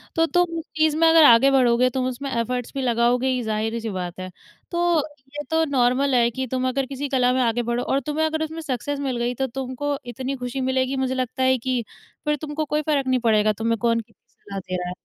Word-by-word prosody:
तो 325 - +3
तुम 350 0 +1
उस - - -6
चीज़ 310 -1 +3
में 330 0 +5
अगर 325 -1 +7
आगे 240 +2 +7
बढ़ोगे, 250 -1 +4
तुम 255 0 -2
उसमें 270 +2 -4
एफर्ट्स 240 +1 -2
भी 270 - -3
लगाओगे 240 +1 +2
ही, 260 - +1
ये - - -2
ज़ाहिर 220 +1 -2
सी 225 -1 -4
बात 180 -2 -5
है। 185 0 -5 0.4
तो 345 -1 +2 0.4
ये 295 - -4
तो 320 0 +3
नॉर्मल 255 +1 +2
है 235 -1 +4
कि 260 +2 -4
तुम 255 0 0
अगर 270 +1 -1
किसी 275 +1 -5
कला 250 -2 +2
में 260 - +1
आगे 240 0 +1
बढ़ो 240 +1 -1
और 275 - +1
तुम्हें 305 +1 0
अगर 315 0 -1
उसमें 320 +1 -5
सक्सेस 285 0 -3
मिल 265 -3 -2
गई 240 +1 -1
तो 265 +1 -1
तुमको 270 +3 -3
इतनी 260 +3 -4
ख़ुशी 250 +1 -4
मिलेगी 260 +1 0
मुझे 260 0 0
लगता 255 0 -2
है 260 0 +4
कि 250 -1 -2 0.4
फ़िर 300 0 +2
तुमको 305 0 -3
कोई 300 +1 0
फ़र्क 285 -3 0
नहीं 255 -1 +2
पड़ेगा 215 -2 +3
तुम्हें 225 +2 -1
कौन 230 -1 +2
कितनी 225 - -15
सलाह 200 -1 -6
दे 185 0 -5
रहा 180 -1 -3
है। - - -4
255 Hz, 245 wpm, -23 LUFS, 235-285 Hz, 0.4 s, अगर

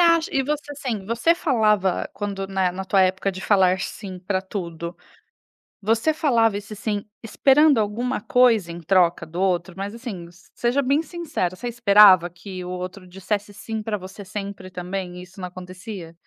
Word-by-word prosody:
acha 335 -1 +4
e 270 - +3
você, 290 +1 -3
assim, 245 -8 -4
você 235 +9 +2
falava 215 - +1
quando, 195 -2 -4
né, 190 -2 +1
na 190 +1 -5
tua 195 0 +3
época 185 +1 +1
de 190 0 -8
falar 190 -3 +3
"sim" 190 -4 -6
pra 185 +1 -2
tudo, 170 -3 -6 0.9
você 225 +9 +2
falava 230 -9 +2
esse 205 +1 -8
"sim" 205 0 -3 0.2
esperando 275 +5 +4
alguma 230 +5 -1
coisa 225 -6 +3
em 170 - -8
troca 175 0 +3
do 170 +3 -7
outro? 180 -1 0
Mas 200 +3 -4
assim, 205 -8 -7 0.3
seja 245 +4 +1
bem 280 +4 +2
sincera, 315 - -3
você 240 +4 -5
esperava 200 -6 +6
que 185 +1 -8
o - - -6
outro 185 +1 -6
dissesse 200 +3 -3
"sim" 220 +1 -5
pra 210 -1 -2
você 190 +1 -10
sempre 195 -1 -6
também, 180 0 -5
e - - -7
isso 185 +2 -15
não 180 - -4
acontecia? 185 0 -9
200 Hz, 175 wpm, -23 LUFS, 185-230 Hz, 0.9 s, esperava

